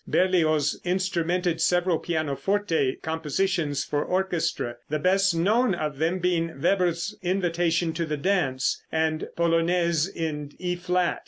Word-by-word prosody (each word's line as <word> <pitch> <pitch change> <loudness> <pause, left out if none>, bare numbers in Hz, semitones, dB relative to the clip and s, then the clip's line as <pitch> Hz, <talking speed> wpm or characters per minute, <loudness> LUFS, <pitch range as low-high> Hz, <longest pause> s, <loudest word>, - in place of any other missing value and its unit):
Berlioz 155 -5 +2
instrumented 180 -1 0
several 175 -1 +2
pianoforte 160 0 0
compositions 160 -1 -1
for 145 0 -1
orchestra, 180 -10 -1
the 155 - 0
best 190 +3 +2
known 205 +5 +2
of 150 -4 -4
them 165 +4 +1
being 165 -4 -1
Weber's 175 +2 +1
"Invitation 175 -3 0
to 165 0 -2
the 150 -1 -2
Dance," 140 -6 0
and 160 0 0
"Polonaise 170 -1 +2
in 150 -5 -4
E 180 -1 -2
flat." 180 0 0
170 Hz, 120 wpm, -25 LUFS, 155-180 Hz, -, Berlioz